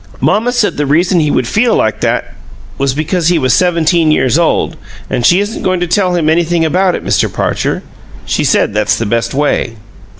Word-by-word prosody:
Mamma 220 +6 +1
said 245 -4 0
the 145 -1 -1
reason 175 +5 +2
he 150 -2 +1
would 130 -4 0
feel 230 - +1
like 110 -1 -1
that - - -1 0.5
was 135 -1 0
because 160 +3 -1
he 175 0 +3
was 130 -5 +1
seventeen 170 -1 +2
years 135 -4 +2
old. 170 - 0 0.4
An' - - -1
she 175 +9 +4
isn't 205 +2 -4
goin' 185 -1 0
to 175 - 0
tell 180 +1 0
him 165 -3 0
anything 165 +1 +1
about 180 +3 +1
it, - - -7
Mr. - - +1
Parcher. - - -2 0.4
She - - -1
said - - +1
that's 105 0 +1
the 115 - -2
best 115 +4 -2
way." 145 -5 -1
165 Hz, 200 wpm, -13 LUFS, 140-180 Hz, 0.5 s, she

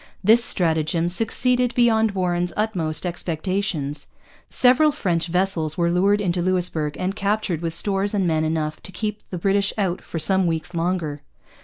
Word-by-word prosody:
This 225 +4 +7
stratagem 165 -3 +1
succeeded 245 +5 +1
beyond 225 -3 +3
Warren's 175 -2 -1
utmost 180 -7 -1
expectations. 170 -4 -3 0.4
Several 260 +5 +5
French 175 - -1
vessels 170 -3 -1
were 170 -1 +1
lured 200 +4 +2
into 180 -3 -1
Louisbourg 170 -5 -1
and 185 +2 -2
captured 200 -5 -1
with 165 -1 -3
stores 200 +2 0
and 195 -2 +1
men 160 -2 +1
enough 155 -1 -2
to - - -7
have 180 - -10
kept 210 -1 -4
the 180 - -5
British 195 +2 +1
out 190 -4 -1
for - - -7
some 190 +2 +2
weeks 165 +2 -3
longer. 165 -4 -2
180 Hz, 160 wpm, -22 LUFS, 165-205 Hz, 0.4 s, This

